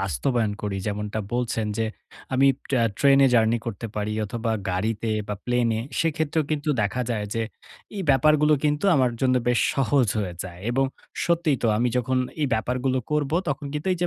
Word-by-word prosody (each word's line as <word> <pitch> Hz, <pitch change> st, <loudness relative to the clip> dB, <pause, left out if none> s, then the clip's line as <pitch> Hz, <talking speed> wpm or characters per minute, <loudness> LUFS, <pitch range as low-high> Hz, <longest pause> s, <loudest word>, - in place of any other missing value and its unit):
বাস্তবায়ন 105 Hz, -, 0 dB
করি, 100 Hz, -2 st, -2 dB
যেমনটা 105 Hz, +1 st, -3 dB
বলছেন, 115 Hz, -3 st, -1 dB
যে 115 Hz, -, +2 dB, 0.5 s
আমি 135 Hz, +1 st, +4 dB
প -, -, -19 dB
আ -, -, +4 dB
ট্রেনে 140 Hz, -1 st, +6 dB
জার্নি 115 Hz, 0 st, +4 dB
করতে 115 Hz, +1 st, -4 dB
পারি, 105 Hz, 0 st, -2 dB
অথবা 115 Hz, +2 st, -3 dB, 0.2 s
গাড়িতে, 110 Hz, +4 st, -1 dB, 0.2 s
বা 105 Hz, -, -1 dB
প্লেনে 120 Hz, -2 st, +1 dB, 0.2 s
সেক্ষেত্রেও 160 Hz, -1 st, 0 dB
কিন্তু 150 Hz, 0 st, -1 dB
দেখা 110 Hz, +5 st, -1 dB
যায় 105 Hz, -3 st, -1 dB
যে 115 Hz, -, 0 dB, 0.5 s
এই 195 Hz, -, -2 dB
ব্যাপারগুলো 150 Hz, +3 st, +4 dB
কিন্তু 150 Hz, +3 st, +1 dB
আমার 130 Hz, -2 st, +3 dB
জন্য 130 Hz, -1 st, +3 dB
বেশ 125 Hz, -, +3 dB
সহজ 135 Hz, -2 st, +2 dB
হয়ে 90 Hz, -4 st, -3 dB
যায়। 90 Hz, -1 st, -9 dB
এবং 135 Hz, +2 st, +2 dB, 0.4 s
সত্যিই 165 Hz, -5 st, +2 dB
তো -, -, +2 dB
আমি 120 Hz, +3 st, +2 dB
যখন 130 Hz, +1 st, +1 dB, 0.2 s
এই -, -, +3 dB
ব্যাপারগুলো 125 Hz, +4 st, 0 dB
করব, 150 Hz, -2 st, 0 dB, 0.2 s
তখন 145 Hz, 0 st, -2 dB
কিন্তু 150 Hz, +5 st, -4 dB
এই 180 Hz, -, -3 dB
যে -, -, +3 dB
125 Hz, 180 wpm, -24 LUFS, 110-140 Hz, 0.5 s, ট্রেনে